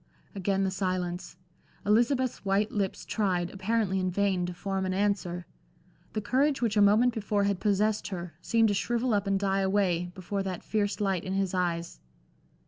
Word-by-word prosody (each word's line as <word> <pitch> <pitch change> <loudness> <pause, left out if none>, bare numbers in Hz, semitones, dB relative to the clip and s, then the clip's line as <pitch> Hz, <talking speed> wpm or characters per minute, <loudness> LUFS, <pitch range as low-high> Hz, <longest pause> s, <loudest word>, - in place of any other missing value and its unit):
Again 195 0 0
the 190 - 0
silence. 185 -2 -3 0.5
Elizabeth's 240 +4 +2
white 200 +2 +1
lips 200 -3 -2
tried, 180 -5 0
apparently 195 -1 0
in 185 0 0
vain, 185 -1 +1
to 180 - -4
form 195 +1 -2
an 185 - -1
answer. 190 -3 -1 0.7
The 215 - -1
courage 275 +6 +2
which 230 -3 0
a 210 - +4
moment 215 +5 +5
before 205 -2 0
had 200 -2 0
possessed 210 +1 +1
her, 175 -4 -6
seemed 225 -2 +3
to - - +2
shrivel 235 +4 0
up 205 -1 +1
and 195 0 +2
die 195 0 +1
away, 190 -3 +1
before 195 +2 -3
that 190 -2 -4
fierce 210 -1 -1
light 195 -4 0
in 190 - -3
his 195 -1 0
eyes. 170 -2 -1
195 Hz, 175 wpm, -29 LUFS, 185-210 Hz, 0.7 s, moment